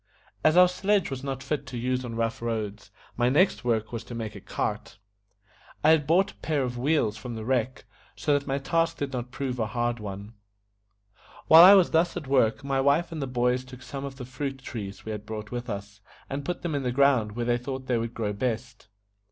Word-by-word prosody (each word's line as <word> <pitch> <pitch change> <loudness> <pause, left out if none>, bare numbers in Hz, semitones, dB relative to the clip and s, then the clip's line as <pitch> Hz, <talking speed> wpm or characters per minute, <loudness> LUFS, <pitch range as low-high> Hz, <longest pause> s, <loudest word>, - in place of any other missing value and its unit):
As 155 +2 +4
our 180 0 +9
sledge 190 -1 0
was 135 0 -5
not 135 -1 -4
fit 150 -4 -3
to 125 -1 -6
use 125 +2 -1
on 120 -2 -6
rough 115 0 -2
roads, 110 -3 -4 0.3
my 120 +1 +2
next 175 +5 +3
work 110 -3 0
was 115 -1 -5
to 120 - -8
make 110 -2 -4
a - - -9
cart. - - -4 0.9
I 155 - +6
had 150 -3 +3
brought 190 +5 +3
a - - -24
pair 150 -4 -1
of 125 -1 -3
wheels 120 -4 +1
from 120 -2 -7
the 110 -1 -6
wreck, 130 0 -1 0.3
so 150 - 0
that 140 0 0
my 135 0 0
task 165 +4 0
did 140 -1 -4
not 125 -1 -4
prove 130 -2 -4
a 110 - 0
hard 120 +1 -1
one. 100 +1 -7 1.1
While 160 +1 +10
I 195 +3 +10
was 185 -3 +4
thus 165 +2 +2
at - - -5
work, 130 -2 +2
my 135 -1 0
wife 145 +6 +2
and 160 -2 -5
the 135 - -2
boys 125 0 +1
took 130 0 -12
some 140 -1 -6
of 140 -1 -6
the 130 -2 -8
fruit 135 +1 -5
trees 100 -6 -7
we 110 - -4
had 105 -1 -5
brought 105 -1 -7
with 120 0 -5
us, 100 0 -6 0.3
and 140 +1 -3
put 175 +5 -4
them 170 -3 -2
in 140 - 0
the 125 -2 -1
ground 130 -5 +3
where 120 +1 -3
they 120 0 +1
thought 130 +1 -5
they 125 -3 +1
would 115 +1 -4
grow 105 -2 -2
best. 115 +1 -4
125 Hz, 230 wpm, -27 LUFS, 115-140 Hz, 1.1 s, While